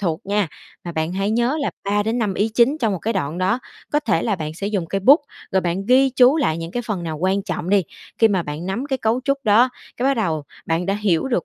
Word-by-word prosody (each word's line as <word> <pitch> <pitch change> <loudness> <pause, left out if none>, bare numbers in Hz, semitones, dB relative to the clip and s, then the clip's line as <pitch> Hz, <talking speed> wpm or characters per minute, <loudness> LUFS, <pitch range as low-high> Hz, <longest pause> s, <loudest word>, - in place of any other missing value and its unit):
thuộc 170 -4 -1
nha, 205 -2 +1 0.4
mà 170 - -5
bạn 160 +1 -2
hãy 195 +2 -1
nhớ 240 +6 +1
là 280 - -1
3 205 +1 +1
đến 225 +3 -1
5 210 -5 0
ý 210 +4 +1
chính 235 +7 +2
trong 225 -7 +1
một 190 - -2
cái 225 +6 -2
đoạn 170 -4 -2
đó. 190 +6 +1 0.3
Có 295 - +3
thể 195 - 0
là 210 -4 0
bạn 155 -2 -5
sẽ 195 +4 -4
dùng 200 -5 -1
cây 195 +4 -2
bút, 275 - +7 0.3
rồi 190 - +3
bạn 180 +2 -2
ghi 260 +2 +5
chú 255 +3 +5
lại 165 - +1
những 165 0 -5
cái 245 +6 -3
phần 205 -6 -2
nào 160 -2 -4
quan 190 +4 +1
trọng 180 -4 -4
đi. 200 -1 +4 0.4
Khi 225 - +6
mà 190 -4 +1
bạn 150 +3 -6
nắm 220 +8 -3
cái 270 -2 -1
cấu 225 +2 +1
trúc 275 0 +1
đó, 220 +4 +5 0.3
cái 255 - 0
bắt 275 - +3
đầu 165 - -1 0.2
bạn 165 +2 0
đã 195 - +1
hiểu 205 0 0
được 245 - 0
200 Hz, 275 wpm, -21 LUFS, 175-240 Hz, 0.4 s, bút